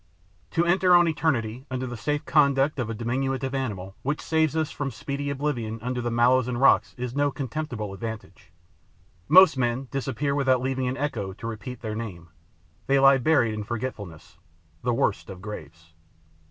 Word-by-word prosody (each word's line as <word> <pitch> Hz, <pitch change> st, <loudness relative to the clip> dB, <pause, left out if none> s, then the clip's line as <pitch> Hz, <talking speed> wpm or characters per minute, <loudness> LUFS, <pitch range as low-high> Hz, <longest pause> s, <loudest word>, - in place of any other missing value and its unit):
To 170 Hz, -, +1 dB
enter 180 Hz, +1 st, +4 dB
on 175 Hz, -1 st, +6 dB
eternity 130 Hz, -6 st, -1 dB
under 130 Hz, 0 st, -3 dB
the 120 Hz, -1 st, -5 dB
safe 145 Hz, +6 st, -2 dB
conduct 140 Hz, -1 st, +3 dB
of 120 Hz, -3 st, -2 dB
a 115 Hz, -, -3 dB
diminutive 130 Hz, +3 st, -2 dB
animal 100 Hz, -8 st, -4 dB
which 145 Hz, +3 st, -2 dB
saves 160 Hz, -1 st, +1 dB
us 160 Hz, -1 st, 0 dB
from 145 Hz, -3 st, -3 dB
speedy 140 Hz, +1 st, -4 dB
oblivion 130 Hz, -6 st, -2 dB
under 125 Hz, 0 st, -2 dB
the 120 Hz, -, -2 dB
mallows 120 Hz, +1 st, +3 dB
and 120 Hz, -1 st, -2 dB
rockets 135 Hz, -, +4 dB
is 125 Hz, 0 st, -4 dB
no 145 Hz, 0 st, +2 dB
contemptible 130 Hz, -7 st, -4 dB
advantage. 100 Hz, -5 st, -8 dB, 0.8 s
Most 185 Hz, -6 st, +7 dB
men 125 Hz, +1 st, -1 dB
disappear 135 Hz, +1 st, -2 dB
without 135 Hz, -3 st, +2 dB
leaving 130 Hz, 0 st, -1 dB
an 130 Hz, +2 st, -2 dB
echo 115 Hz, -10 st, -3 dB
to 110 Hz, -, -10 dB
repeat 115 Hz, +2 st, -6 dB
their 110 Hz, -2 st, -4 dB
name; 95 Hz, -7 st, -7 dB, 0.6 s
they 140 Hz, -, +4 dB
lie 135 Hz, 0 st, +6 dB
buried 125 Hz, -5 st, +3 dB
in 105 Hz, 0 st, -4 dB
forgetfulness, 105 Hz, -9 st, -6 dB, 0.4 s
the 120 Hz, -, 0 dB
worst 105 Hz, -4 st, 0 dB
of 95 Hz, -2 st, -8 dB
graves. 85 Hz, -5 st, -10 dB
125 Hz, 170 wpm, -25 LUFS, 110-140 Hz, 0.8 s, Most